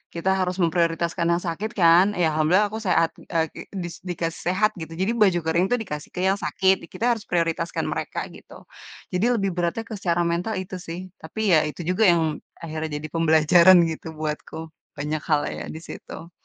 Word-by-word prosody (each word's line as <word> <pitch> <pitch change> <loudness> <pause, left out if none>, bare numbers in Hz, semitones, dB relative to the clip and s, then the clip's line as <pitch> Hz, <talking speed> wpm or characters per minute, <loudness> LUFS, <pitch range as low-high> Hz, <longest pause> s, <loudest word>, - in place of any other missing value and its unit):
kita 170 +3 -1
harus 180 0 0
memprioritaskan 170 0 0
yang 170 - +2
sakit 200 +7 -3
kan, 170 +2 +7 0.2
ya - - +4
alhamdulillah 180 +7 +3
aku 220 +2 -5
seha,t 165 -2 +2 0.2
eee, 160 -1 +3
kek - - -9 0.2
dis 175 -1 -6
dikasih 165 -1 -3
sehat 215 +3 +2
gitu, 160 0 -7
jadi 195 - +1
baju 185 -4 +5
kering 170 +3 +2
tuh 245 - +3
dikasih 150 -7 -7
ke - - -4
yang 195 - +3
sakit, 190 0 +3
di 170 - -10
kita 230 - -3
harus 220 - -9
prioritaskan 170 -1 -1
mereka - - -3 0.2
gitu. - - -15 0.6
Jadi 185 - +2
lebih 195 -1 0
beratnya 175 +5 -1
ke 220 - -6
secara 175 -2 +1
mental 175 +6 -1
itu 185 0 -6
sih, 165 +2 -5 0.2
tapi 195 +3 +1
ya 155 - +4
itu 160 - -8
juga 185 +5 +2
yang 170 -1 +2 0.4
akhirnya 160 -1 -4
jadi 155 - -6
pembelajaran 165 +3 +6
gitu 160 - -7
buatku, 155 +1 -4 0.3
banyak 150 +1 -2
hal 150 -1 +3
ya - - -5
di 160 - -7
situ. 165 0 -10
170 Hz, 195 wpm, -24 LUFS, 160-185 Hz, 0.6 s, kan